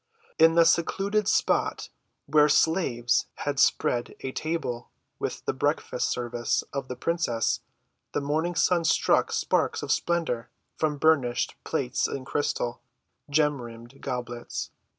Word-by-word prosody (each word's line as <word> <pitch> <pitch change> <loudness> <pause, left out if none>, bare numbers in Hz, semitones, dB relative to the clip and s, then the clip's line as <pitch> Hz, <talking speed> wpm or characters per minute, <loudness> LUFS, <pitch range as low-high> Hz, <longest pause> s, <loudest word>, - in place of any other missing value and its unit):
In 165 0 +6
the 170 0 +6
secluded 195 +5 +1
spot - - +1 0.4
where 150 +1 +4
slaves 135 -8 +2
had 145 -2 -3
spread 120 -1 +2
a 130 - -4
table 140 -6 -3 0.3
with - - -4
the - - 0
breakfast‐ - - -1
service 120 -1 -1
of 140 -2 -3
the 125 - -5
princess, 125 -5 0 0.5
the - - +1
morning 155 +5 -1
sun 175 +1 +3
struck 160 - +3
sparks - - 0
of - - -2
splendor 165 -9 0 0.3
from 155 -2 0
burnished 140 -6 +2
plates 130 -1 -1
and 130 -1 -5
crystal, 125 -4 -2 0.5
gem‐rimmed 135 -4 -1
goblets. 120 -2 -5
140 Hz, 125 wpm, -27 LUFS, 120-165 Hz, 0.5 s, In